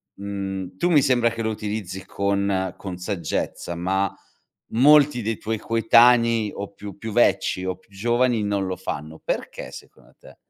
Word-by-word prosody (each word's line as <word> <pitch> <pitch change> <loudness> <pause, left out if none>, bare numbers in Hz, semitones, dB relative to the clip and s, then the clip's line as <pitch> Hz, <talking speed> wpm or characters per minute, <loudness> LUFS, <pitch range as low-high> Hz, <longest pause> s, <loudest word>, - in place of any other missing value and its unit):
mhmm, 95 -2 -5
tu 175 - +1
mi 150 -4 +6
sembra 125 -4 +3
che 115 0 -5
lo 110 - -1
utilizzi 105 -3 -5
con 100 -1 0
con 95 -3 -6
saggezza, 90 -2 -3
ma 95 +3 0 0.6
molti 145 +1 +5
dei 115 +1 -2
tuoi 110 0 -2
coetanei 115 0 +4
o 100 - -6
più 100 -2 -9
più 110 -1 -5
vecchi 100 -5 +2
o 95 0 -2
più - - -30
giovani 120 +2 +1
non 100 -2 -1
lo 95 - -2
fanno, 80 -3 -6
perché - - -4
secondo - - -14
te? - - -16
100 Hz, 160 wpm, -23 LUFS, 95-115 Hz, 0.6 s, mi